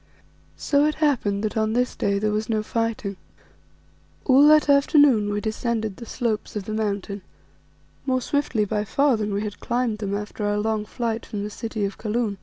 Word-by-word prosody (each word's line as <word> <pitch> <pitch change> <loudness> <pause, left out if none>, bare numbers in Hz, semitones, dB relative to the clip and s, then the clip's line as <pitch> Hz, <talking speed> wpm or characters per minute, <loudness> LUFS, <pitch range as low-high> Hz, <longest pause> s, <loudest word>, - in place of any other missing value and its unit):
So 285 0 +2
it 305 0 +1
happened 235 -10 +1
that 215 - -2
on 220 0 +1
this 250 +1 0
day 200 0 0
there 210 +1 0
was 215 +1 -2
no 215 -1 0
fighting. 220 -3 -2 1.1
All 275 +2 +6
that 305 0 +6
afternoon 280 -6 +5
we 205 - -1
descended 220 -2 -2
the 235 - -9
slopes 225 -4 -2
of 205 -2 -3
the 215 - -4
Mountain, 205 -2 -2 0.9
more 255 -1 +2
swiftly 255 -4 0
by 210 0 -1
far 275 +5 +2
than 210 -1 -2
we 200 +1 -1
had 205 -1 -6
climbed 240 -3 -1
them 200 -2 -2
after 210 +1 -5
our 205 0 +1
long 215 0 -1
flight 230 -1 -3
from 205 -1 -5
the 210 - -5
city 220 -1 -3
of 195 - -5
Kaloon. 215 -2 -1
220 Hz, 190 wpm, -24 LUFS, 210-245 Hz, 1.1 s, All